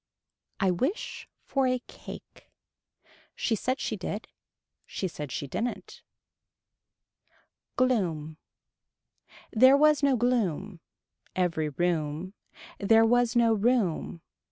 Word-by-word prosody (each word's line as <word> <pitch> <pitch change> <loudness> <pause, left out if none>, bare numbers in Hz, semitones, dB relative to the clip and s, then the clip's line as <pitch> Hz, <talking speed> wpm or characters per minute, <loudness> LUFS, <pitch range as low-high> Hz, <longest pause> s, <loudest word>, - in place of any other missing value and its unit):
I 190 -2 +3
wish 265 - -3 0.2
for 270 -2 +1
a 255 0 +2
cake. - - -12 0.9
She 235 - -1
said 255 +6 -2
she 220 - -2
did. 205 +2 -5 0.6
She 190 - -3
said 150 -5 -7
she - - -3
didn't. 230 - -4 1.7
Gloom. 170 -12 0 1.1
There 260 +4 +6
was 300 0 +4
no 280 -2 +3
gloom. 210 -6 0 0.6
Every 165 -4 0
room. 160 +2 -2 0.5
There 225 +3 +5
was 245 +1 +2
no 230 -1 +4
room. 205 -7 0
215 Hz, 100 wpm, -28 LUFS, 170-250 Hz, 1.7 s, There